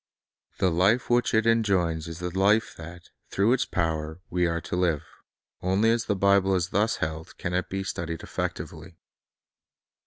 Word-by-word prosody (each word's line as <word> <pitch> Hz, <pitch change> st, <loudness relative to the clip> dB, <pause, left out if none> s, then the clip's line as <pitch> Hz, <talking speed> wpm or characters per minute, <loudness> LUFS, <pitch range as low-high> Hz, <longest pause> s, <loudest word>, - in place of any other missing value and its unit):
The 95 Hz, -, +2 dB
life 100 Hz, +9 st, +2 dB
which 120 Hz, 0 st, +3 dB
it 110 Hz, -1 st, +2 dB
enjoins 95 Hz, -8 st, +1 dB
is 85 Hz, -1 st, -7 dB
the 90 Hz, 0 st, -5 dB
life 105 Hz, +4 st, +3 dB
that, 85 Hz, +1 st, -11 dB, 0.2 s
through 105 Hz, +5 st, +2 dB
its 130 Hz, -, +1 dB
power, 80 Hz, -1 st, -2 dB
we 90 Hz, 0 st, +2 dB
are 85 Hz, 0 st, -1 dB
to -, -, -4 dB
live. 85 Hz, -5 st, +1 dB, 0.6 s
Only 95 Hz, +5 st, +2 dB
as 115 Hz, +1 st, 0 dB
the 105 Hz, -, 0 dB
Bible 100 Hz, 0 st, +3 dB
is 90 Hz, -1 st, 0 dB
thus 110 Hz, +3 st, +1 dB
held 80 Hz, +1 st, -5 dB
can 90 Hz, -, -4 dB
it 90 Hz, +1 st, -1 dB
be 95 Hz, 0 st, -3 dB
studied 85 Hz, -3 st, -4 dB
effectively. -, -, -5 dB
90 Hz, 165 wpm, -26 LUFS, 85-105 Hz, 0.6 s, which